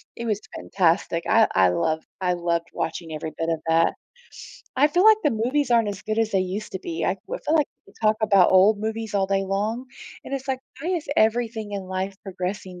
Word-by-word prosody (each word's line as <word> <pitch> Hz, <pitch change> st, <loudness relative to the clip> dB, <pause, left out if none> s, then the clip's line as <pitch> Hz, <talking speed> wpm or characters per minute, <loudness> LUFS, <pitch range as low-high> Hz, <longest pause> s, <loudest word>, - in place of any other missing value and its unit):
it 235 Hz, -, -6 dB
was 215 Hz, -2 st, -1 dB
fantastic, 170 Hz, -2 st, 0 dB
I 225 Hz, -1 st, +5 dB
I 95 Hz, -1 st, +5 dB
loved 160 Hz, -, -1 dB, 0.2 s
I 180 Hz, -1 st, +1 dB
loved 170 Hz, -1 st, -1 dB
watching 165 Hz, 0 st, -4 dB
every 155 Hz, +1 st, -5 dB
bit 165 Hz, 0 st, -1 dB
of 165 Hz, -1 st, 0 dB
that. 165 Hz, +1 st, +3 dB, 0.8 s
I 280 Hz, +3 st, +5 dB
feel 350 Hz, +5 st, +2 dB
like 435 Hz, 0 st, +8 dB
the 295 Hz, -, +4 dB
movies 250 Hz, +5 st, 0 dB
aren't 230 Hz, -3 st, +4 dB
as 200 Hz, -2 st, -5 dB
good 215 Hz, +1 st, -2 dB
as 225 Hz, -1 st, +1 dB
they 195 Hz, -, +2 dB
used 190 Hz, +3 st, -4 dB
to 190 Hz, -, -3 dB
be, 165 Hz, -2 st, -4 dB
I 185 Hz, -, +1 dB
well, -, -, -4 dB
I -, -, -30 dB
feel 320 Hz, -, +3 dB
like 300 Hz, -, +3 dB, 0.2 s
we -, -, -20 dB
talk 215 Hz, -1 st, +3 dB
about 200 Hz, -4 st, +4 dB
old 200 Hz, +3 st, +6 dB
movies 220 Hz, 0 st, -4 dB
all 195 Hz, -1 st, +2 dB
day 195 Hz, 0 st, +1 dB
long, 210 Hz, +6 st, -2 dB, 0.4 s
and 275 Hz, -, -4 dB
it's 270 Hz, 0 st, -5 dB
like, 265 Hz, -1 st, -1 dB, 0.2 s
why 340 Hz, +5 st, -2 dB
is 340 Hz, -6 st, -2 dB
everything 220 Hz, -1 st, +1 dB
in 200 Hz, -1 st, -3 dB
life 190 Hz, +1 st, -3 dB
progressing 185 Hz, -1 st, -5 dB
200 Hz, 225 wpm, -24 LUFS, 180-225 Hz, 0.8 s, like